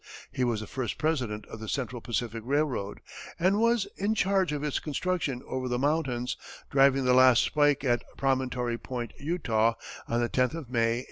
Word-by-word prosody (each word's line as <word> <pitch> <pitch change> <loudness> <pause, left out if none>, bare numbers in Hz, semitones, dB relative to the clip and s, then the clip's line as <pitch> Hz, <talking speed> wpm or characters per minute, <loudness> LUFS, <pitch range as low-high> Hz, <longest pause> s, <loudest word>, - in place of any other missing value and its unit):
He 130 - -1
was 115 -3 0
the - - -5
first 130 +2 -4
president 125 -10 -1
of 115 - -9
the 110 -1 -6
Central 125 -3 -3
Pacific 115 -1 -3
Railroad, 130 -6 -1 0.4
and 185 +4 +2
was 230 -2 +3
in 205 +3 0
charge 190 -3 +2
of 145 -1 -3
its 150 -2 0
construction 150 -4 -2
over 130 -1 -3
the 125 0 0
mountains, 130 -3 0 0.3
driving 135 -1 +4
the 125 - +4
last 130 -1 +6
spike 145 -2 +2
at 120 -3 +1
Promontory 125 -3 0
Point, 120 -3 -5
Utah, 115 -8 +1 0.3
on 120 - 0
the 120 - +1
tenth 125 +5 +1
of 145 -7 -7
May, 115 -1 +2
1869. - - -2
130 Hz, 185 wpm, -28 LUFS, 120-150 Hz, 0.4 s, last